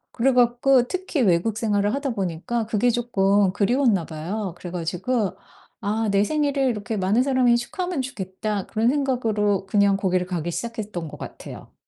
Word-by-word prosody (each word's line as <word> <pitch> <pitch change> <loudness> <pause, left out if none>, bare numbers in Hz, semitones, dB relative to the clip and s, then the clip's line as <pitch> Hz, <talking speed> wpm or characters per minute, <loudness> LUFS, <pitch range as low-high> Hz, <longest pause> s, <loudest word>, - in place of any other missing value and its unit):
그래 260 +3 +3
갖고 245 +1 +4
특히 370 -4 -2
외국 200 +1 +2
생활을 205 -2 +1
하다 280 -1 -2
보니까 210 +4 -2
그게 230 +2 +2
조끔 205 -5 +2
그리웠나 210 - +2
봐요. 175 +5 -4
그래 175 - -8
가지고 180 +6 -2 0.5
'아 220 +1 -1
내 200 0 +3
생일을 285 +2 0
이렇게 225 0 -3
많은 200 +6 +2
사람이 255 -3 +3
축하하면 355 +6 -3
좋겠다.' 205 -4 -4
그런 225 +2 +1
생각으로 225 -8 0
그냥 200 0 +3
거기를 185 -2 0
가기 175 -2 -3
시작했던 210 -5 -5
것 - - -9
같아요. - - -10
215 Hz, 365 characters per minute, -23 LUFS, 195-245 Hz, 0.5 s, 갖고